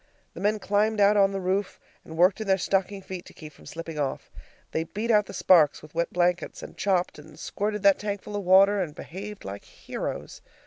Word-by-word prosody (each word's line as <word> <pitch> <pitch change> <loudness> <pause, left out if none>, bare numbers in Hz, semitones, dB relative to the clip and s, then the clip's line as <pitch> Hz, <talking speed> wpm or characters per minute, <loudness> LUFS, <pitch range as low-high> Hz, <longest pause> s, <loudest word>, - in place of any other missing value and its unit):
The - - -9
men 210 +3 +1
climbed 210 +2 +1
out 205 +1 +5
on 200 -1 +4
the 195 - -3
roof, 190 +2 -2 0.2
and 160 - -10
worked 180 +5 +4
in 215 - -5
their 190 0 +4
stocking 195 +1 -1
feet 185 -2 -7
to - - -15
keep 155 -2 -11
from - - -17
slipping 165 -2 -7
off. 140 -2 -3 0.4
They 160 - -1
beat 215 +7 -2
out 210 -2 +4
the - - -8
sparks 160 -7 +4
with 155 - -14
wet 170 +1 -1
blankets, 175 -1 0
and - - -10
chopped, 185 -5 0
and 150 +1 -14
squirted 210 0 -3
that 200 -1 +5
tankful 205 0 -5
of 205 - -2
water, 195 +2 +5
and 155 -5 -4
behaved 200 +4 -8
like 100 +1 -7
heroes. - - -7
190 Hz, 215 wpm, -26 LUFS, 170-205 Hz, 0.4 s, out